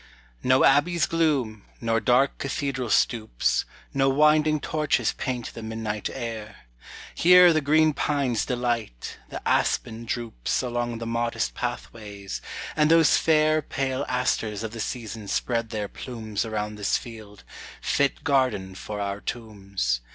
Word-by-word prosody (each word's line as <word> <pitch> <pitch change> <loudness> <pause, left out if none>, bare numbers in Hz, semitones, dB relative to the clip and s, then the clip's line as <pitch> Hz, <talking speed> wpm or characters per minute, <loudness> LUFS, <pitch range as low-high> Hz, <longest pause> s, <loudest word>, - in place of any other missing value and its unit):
No 130 +1 +4
abbey's 155 +5 +4
gloom, 140 -11 0 0.2
nor 115 -1 +1
dark 125 +4 +2
cathedral 135 -3 -2
stoops, 110 - +1 0.3
No 135 0 +3
winding 150 +2 +4
torches 150 +1 0
paint 125 -3 -4
the 115 - -8
midnight 110 -1 -4
air; 110 - -7 0.5
Here 180 0 +7
the 155 - +2
green 155 +2 +4
pines 140 -7 0
delight, 120 - -3
the - - -6
aspen 115 +1 0
droops 115 - -2
Along 120 -1 -2
the 115 - -6
modest 115 - -1
pathways, 100 - -6 0.3
and 150 0 +3
those 165 -1 +6
fair 155 -1 +3
Pale 135 -1 -2
asters 115 -4 -1
of 110 - -4
the 115 - -8
season 110 -2 -5
spread 115 +2 -1
their 105 -2 -3
plumes 110 -4 -5
Around 105 -1 -3
this 105 -2 +1
field, 110 -3 -11 0.4
fit 140 -1 0
garden 125 -10 +1
for 105 +2 -6
our 100 0 -3
tombs. 100 - -3
120 Hz, 135 wpm, -25 LUFS, 105-140 Hz, 0.5 s, Here